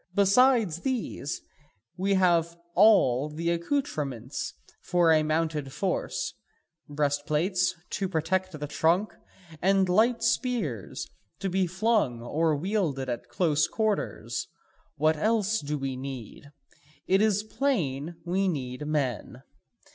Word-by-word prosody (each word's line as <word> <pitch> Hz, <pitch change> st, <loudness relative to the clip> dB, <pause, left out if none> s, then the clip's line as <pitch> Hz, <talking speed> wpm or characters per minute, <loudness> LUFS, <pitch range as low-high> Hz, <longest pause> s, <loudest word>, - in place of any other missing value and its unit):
Besides 205 Hz, -3 st, +4 dB
these, 245 Hz, -, -3 dB, 0.5 s
we 195 Hz, +2 st, +1 dB
have 170 Hz, -2 st, +2 dB, 0.2 s
all 155 Hz, -, +5 dB
the 165 Hz, +3 st, -2 dB
accoutrements 150 Hz, -, -2 dB, 0.3 s
for 175 Hz, -2 st, +3 dB
a 155 Hz, -1 st, +5 dB
mounted 155 Hz, -2 st, -1 dB
force, 185 Hz, +6 st, -2 dB, 0.6 s
breast 145 Hz, 0 st, -1 dB
plates 180 Hz, +4 st, +1 dB, 0.2 s
to 195 Hz, -1 st, -2 dB
protect 185 Hz, 0 st, -1 dB
the 150 Hz, -, -3 dB
trunk, 170 Hz, +7 st, +1 dB, 0.5 s
and 195 Hz, +1 st, +3 dB
light 225 Hz, +6 st, +3 dB
spears 225 Hz, -, -1 dB, 0.3 s
to 195 Hz, -2 st, -3 dB
be 185 Hz, 0 st, +1 dB
flung 190 Hz, -, +1 dB
or 155 Hz, +6 st, 0 dB
wielded 155 Hz, -6 st, -1 dB
at 120 Hz, 0 st, -4 dB
close 155 Hz, +3 st, +2 dB
quarters. 220 Hz, -2 st, -2 dB, 0.5 s
What 155 Hz, +1 st, +2 dB
else 220 Hz, +3 st, +1 dB
do 150 Hz, +1 st, -3 dB
we 135 Hz, -1 st, -3 dB
need? 130 Hz, +1 st, -8 dB, 0.6 s
It 190 Hz, +2 st, +3 dB
is 210 Hz, -1 st, +2 dB
plain 175 Hz, -, -1 dB
we 190 Hz, +3 st, +1 dB
need 135 Hz, -4 st, -3 dB
men. 130 Hz, -4 st, -2 dB
170 Hz, 115 wpm, -27 LUFS, 145-195 Hz, 0.6 s, all